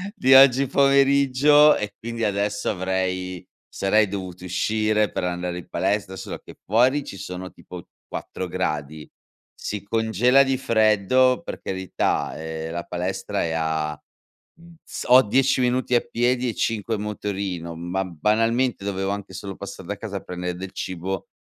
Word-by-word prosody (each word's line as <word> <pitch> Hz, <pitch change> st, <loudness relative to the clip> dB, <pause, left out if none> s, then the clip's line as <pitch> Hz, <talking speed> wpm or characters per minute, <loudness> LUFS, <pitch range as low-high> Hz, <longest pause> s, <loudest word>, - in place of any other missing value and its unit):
di 130 Hz, +1 st, +4 dB
oggi 135 Hz, 0 st, +7 dB
pomeriggio 140 Hz, +2 st, +5 dB
e 105 Hz, -1 st, -4 dB
quindi 115 Hz, 0 st, -5 dB
adesso 100 Hz, 0 st, -1 dB
avrei 95 Hz, -1 st, -2 dB, 0.2 s
sarei 105 Hz, +2 st, +2 dB
dovuto 95 Hz, -2 st, -6 dB
uscire 105 Hz, +3 st, +1 dB
per -, -, -3 dB
andare 90 Hz, 0 st, -3 dB
in -, -, -12 dB
palestra, 100 Hz, 0 st, -1 dB
solo -, -, -7 dB
che -, -, -13 dB
fuori 130 Hz, +7 st, +3 dB
ci 95 Hz, -, -9 dB
sono 90 Hz, -1 st, -7 dB
tipo 90 Hz, -2 st, -11 dB, 0.2 s
4 95 Hz, -, -6 dB
gradi, 75 Hz, -4 st, -3 dB, 0.5 s
si 105 Hz, -1 st, -5 dB
congela 115 Hz, +5 st, +3 dB
di 135 Hz, -1 st, 0 dB
freddo, 115 Hz, -, +3 dB
per -, -, -6 dB
carità, 95 Hz, -1 st, -2 dB
ehm, 80 Hz, 0 st, -5 dB
la 85 Hz, 0 st, -4 dB
palestra 90 Hz, +2 st, -3 dB
è 80 Hz, -, -2 dB
a, 80 Hz, -2 st, -2 dB, 0.6 s
uhm, 170 Hz, 0 st, -16 dB
s -, -, -7 dB
ho 125 Hz, +1 st, +9 dB
10 130 Hz, +4 st, +2 dB
minuti 125 Hz, 0 st, +1 dB
a 120 Hz, -, +5 dB
piedi 125 Hz, +2 st, 0 dB
e 115 Hz, -, -2 dB
5 110 Hz, 0 st, -1 dB
in 105 Hz, -, -5 dB
motorino, 100 Hz, -5 st, -4 dB
ma 90 Hz, +3 st, -2 dB
banalmente 115 Hz, +6 st, 0 dB
dovevo 95 Hz, -1 st, -2 dB
anche 100 Hz, 0 st, -5 dB
solo 100 Hz, -2 st, -6 dB
passar -, -, -8 dB
da -, -, -4 dB
casa -, -, -6 dB
a -, -, -3 dB
prendere 90 Hz, 0 st, -5 dB
del 95 Hz, +1 st, -7 dB
cibo; 95 Hz, +1 st, -5 dB
100 Hz, 155 wpm, -23 LUFS, 90-125 Hz, 0.6 s, ho